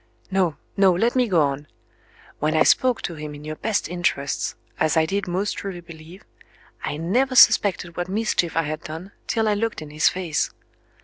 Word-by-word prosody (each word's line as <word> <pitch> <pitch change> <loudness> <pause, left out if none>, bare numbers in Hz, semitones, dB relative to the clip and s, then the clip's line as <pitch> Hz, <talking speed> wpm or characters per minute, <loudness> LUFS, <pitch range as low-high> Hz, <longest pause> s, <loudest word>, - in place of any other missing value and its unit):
No, 180 -6 +1 0.2
no; 195 -1 +5
let 230 +8 +1
me 250 -2 +3
go 175 -7 +3
on. 140 +1 -2 0.7
When 155 +1 0
I - - +6
spoke 255 -2 +3
to 175 - -3
him 150 -2 -7
in 145 +1 -11
your 155 0 -5
best 215 -1 -1
interests 170 -5 -1 0.2
(as 155 - +2
I 160 - +4
did 195 +3 -2
most 190 +4 -1
truly 195 -3 -5
believe) 170 +2 -13 0.6
I 145 - -3
never 250 - 0
suspected 185 -7 +5
what 175 +1 -3
mischief 195 -5 0
I 165 - +3
had 155 +1 -4
done, 165 +4 -8 0.2
till 225 -1 +1
I 210 - +3
looked 225 +2 -2
in 155 -2 -9
his 155 +1 +3
face. 175 -5 -1
175 Hz, 190 wpm, -23 LUFS, 155-200 Hz, 0.7 s, I